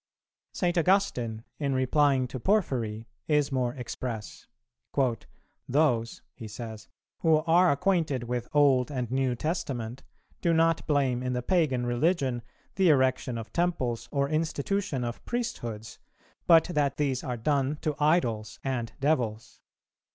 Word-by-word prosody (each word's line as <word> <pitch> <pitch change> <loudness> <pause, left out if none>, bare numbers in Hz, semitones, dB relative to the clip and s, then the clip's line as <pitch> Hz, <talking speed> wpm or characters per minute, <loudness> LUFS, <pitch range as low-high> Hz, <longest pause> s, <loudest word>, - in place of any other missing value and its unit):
St. 175 -2 0
Augustine, 140 - +1 0.2
in 140 -3 0
replying 130 0 +2
to 130 - -5
Porphyry, 120 - 0 0.2
is 150 -2 +2
more 125 -2 0
express; 120 -3 -6 1.2
"Those," 125 -5 +1
he 110 - -9
says, 110 0 -8 0.3
"who 155 -2 +3
are 175 +2 +5
acquainted 150 -4 +1
with 120 0 -3
Old 140 -3 +4
and 125 -4 -3
New 130 -1 +1
Testament 130 -5 -3 0.4
do 170 - +2
not 165 0 +2
blame 135 -5 +1
in 125 0 -2
the 125 -1 -2
pagan 140 -7 +1
religion 130 0 +1 0.4
the 190 -3 +4
erection 130 -3 +2
of 115 -1 -8
temples 170 -10 -1
or 140 -1 +1
institution 155 0 -1
of 120 0 -5
priesthoods, 120 - -4 0.5
but 165 -2 +7
that 145 -4 +1
these 135 -4 0
are 125 -3 -3
done 140 +3 0
to 155 - 0
idols 120 -9 +1
and 125 -4 -2
devils. 120 -7 -1
135 Hz, 130 wpm, -28 LUFS, 120-155 Hz, 1.2 s, but